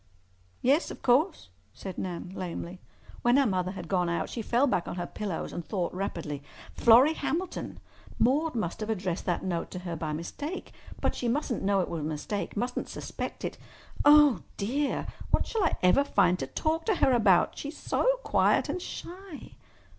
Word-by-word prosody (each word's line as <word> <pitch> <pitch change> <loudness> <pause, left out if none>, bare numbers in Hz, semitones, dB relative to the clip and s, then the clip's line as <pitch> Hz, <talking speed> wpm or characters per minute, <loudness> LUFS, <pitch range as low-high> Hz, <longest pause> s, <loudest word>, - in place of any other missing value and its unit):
"Yes, 280 +7 +3
of - - -9
course," 285 - +2 0.3
said 190 -2 -7
Nan 180 -1 -4
lamely. 180 -1 -5 0.4
When 240 +2 +4
her 280 - +5
mother 185 -3 0
had - - -7
gone 180 -3 +1
out 170 - -1
she 235 - -3
fell 240 +5 +2
back 210 -10 0
on - - -4
her 175 -1 -3
pillows 195 -2 -4
and 175 - -4
thought 180 -1 -2
rapidly. 165 -6 -4 0.3
"Florrie 245 +7 +6
Hamilton! 350 +3 -3 0.4
Maude 290 +5 +2
must 175 -7 -2
have 215 0 -4
addressed 185 -4 -2
that 175 - 0
note 175 -3 -2
to - - -7
her 170 -1 -3
by 155 -1 -3
mistake. 285 - -5 0.3
But - - +1
she 245 - -3
mustn't 250 -1 0
know 195 0 +2
it - - -2
was 170 - -3
a - - -4
mistake—mustn't 205 +9 -3
suspect - - -5
it. - - -5 0.4
Oh, 295 -3 +7 0.2
dear! 270 +8 -1 0.2
What - - +2
shall 445 -4 -1
I 335 - +1
ever 180 +10 +5
find 180 -10 +3
to 135 - -3
talk 320 - -1
to 430 - +3
her 265 - +3
about? 215 -7 +4
She - - -5
is 300 - -7
so - - 0 0.2
quiet - - +3
and 360 - -2
shy." 360 -2 -8
215 Hz, 185 wpm, -29 LUFS, 180-285 Hz, 0.4 s, Oh